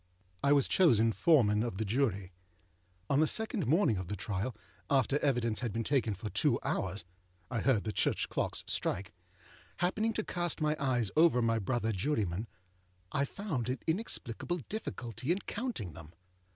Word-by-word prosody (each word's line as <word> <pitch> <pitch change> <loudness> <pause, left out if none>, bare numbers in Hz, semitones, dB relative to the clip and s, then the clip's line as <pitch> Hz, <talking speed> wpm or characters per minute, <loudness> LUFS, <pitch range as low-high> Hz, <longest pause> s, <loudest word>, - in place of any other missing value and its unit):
I 140 - +4
was 140 -2 +4
chosen 115 - +4
Foreman 110 -7 +4
of 115 -5 -2
the 110 - -1
Jury. 100 -5 0 0.8
On 140 - +2
the 155 - +4
second 220 - +1
morning 150 - +3
of 95 -1 -4
the 105 - -3
trial, 100 +4 -3 0.3
after 135 +1 +2
evidence 120 -6 +1
had 120 -4 -2
been 115 +3 -2
taken 115 -5 +1
for 105 +2 -6
two - - +2
hours 95 -1 -2 0.5
(I 120 - 0
heard 115 -2 +2
the 110 - -2
church - - +1
clocks - - -1
strike), 95 -1 -1 0.6
happening 215 +6 0
to 215 - -1
cast 175 -2 -2
my 155 0 +1
eyes 125 -7 +1
over 155 -5 +5
my 115 -1 +2
brother 115 +1 -1
jurymen, 105 - -1 0.6
I 140 0 +1
found 140 - -3
an 130 - -1
inexplicable 175 - -2
difficulty 130 - -3
in 180 - +2
counting 225 - -4
them. 80 0 -11
120 Hz, 165 wpm, -32 LUFS, 105-155 Hz, 0.8 s, over